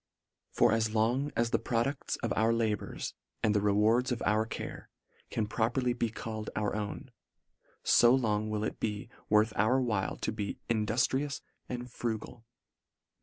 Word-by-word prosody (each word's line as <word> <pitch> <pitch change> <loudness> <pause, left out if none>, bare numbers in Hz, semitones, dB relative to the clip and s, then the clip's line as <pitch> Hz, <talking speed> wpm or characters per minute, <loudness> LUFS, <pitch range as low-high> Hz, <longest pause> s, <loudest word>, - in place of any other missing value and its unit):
For - - +3
as 110 -1 +1
long 125 +7 +2
as 115 0 +1
the - - +2
produces 125 +4 -1
of - - 0
our 110 +2 +3
labours 110 -3 -1 0.3
and 105 - +3
the 105 - +2
rewards 105 +5 +3
of 120 - -2
our 110 +1 +2
care, - - -6 0.4
can 110 - -1
properly 120 +4 0
be 120 -1 -1
called 110 -1 -5
our 105 -1 0
own, 105 +4 -5 0.7
fo 120 - +6
long 110 -4 +2
will 105 0 -1
it - - -3
be 105 0 -3 0.2
worth 105 +1 +4
our 110 +6 +3
while 110 -7 -1
to - - -2
be 105 -2 -4
in 110 -2 +1
duftrious 135 +5 0 0.3
and 125 0 -4
frugal. 115 -1 -5
110 Hz, 160 wpm, -31 LUFS, 105-120 Hz, 0.7 s, fo